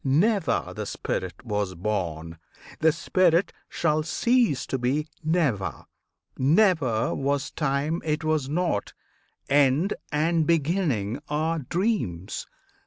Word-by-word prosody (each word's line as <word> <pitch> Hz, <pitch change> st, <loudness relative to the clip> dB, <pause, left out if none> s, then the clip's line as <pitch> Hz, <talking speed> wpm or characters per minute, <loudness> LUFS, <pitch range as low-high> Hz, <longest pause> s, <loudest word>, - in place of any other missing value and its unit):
Never 165 Hz, -, +1 dB
the -, -, -4 dB
spirit 90 Hz, +4 st, -4 dB
was 105 Hz, -4 st, -2 dB
born; 85 Hz, -4 st, -3 dB, 0.4 s
the 160 Hz, 0 st, +5 dB
spirit 175 Hz, +2 st, +2 dB, 0.2 s
shall 155 Hz, -2 st, +1 dB
cease 230 Hz, -, +1 dB
to 130 Hz, -, -2 dB
be 135 Hz, +5 st, 0 dB, 0.2 s
never; 135 Hz, -, 0 dB, 0.5 s
Never 140 Hz, -, +3 dB
was 140 Hz, 0 st, -1 dB
time 150 Hz, +2 st, -1 dB
it 155 Hz, 0 st, -1 dB
was 155 Hz, -4 st, 0 dB
not; 165 Hz, -, -1 dB, 0.5 s
End 145 Hz, +6 st, +3 dB, 0.2 s
and 160 Hz, +1 st, +1 dB
Beginning 150 Hz, -, +1 dB
are 160 Hz, +2 st, 0 dB
dreams! 145 Hz, -, -2 dB
150 Hz, 105 wpm, -26 LUFS, 120-165 Hz, 0.5 s, the